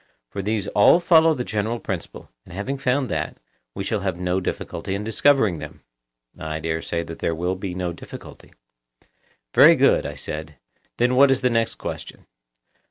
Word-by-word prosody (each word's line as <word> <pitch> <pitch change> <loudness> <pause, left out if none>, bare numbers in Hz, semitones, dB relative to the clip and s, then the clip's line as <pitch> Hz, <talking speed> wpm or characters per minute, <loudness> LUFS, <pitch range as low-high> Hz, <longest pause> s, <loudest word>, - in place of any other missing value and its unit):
For 100 - -4
these 105 0 -1
all 105 +11 +5
follow 165 -2 +5
the 125 - -3
general 110 +1 -2
principle, - - -6
and 90 - -12
having 135 +8 -3
found 135 0 +1
that, - - -3 0.4
we 100 - -3
shall 105 +2 -1
have 95 -3 -2
no 90 +1 0
difficulty 95 +1 -4
in 100 - -4
discovering 110 - +2
them. - - -10 0.6
I 80 0 -4
dare 80 0 -2
say 85 0 -2
that 80 0 -9
there 85 - -1
will 90 +3 -1
be 95 -1 -5
no 90 -2 -3
difficulty. - - -12 1.0
Very - - +8
good, - - +3
I - - -7
said; 75 0 -6 0.4
then 120 +1 +2
what 140 +1 +6
is 135 -1 +2
the 125 - +2
next 115 -1 0
question? - - -7
100 Hz, 175 wpm, -23 LUFS, 90-125 Hz, 1.0 s, Very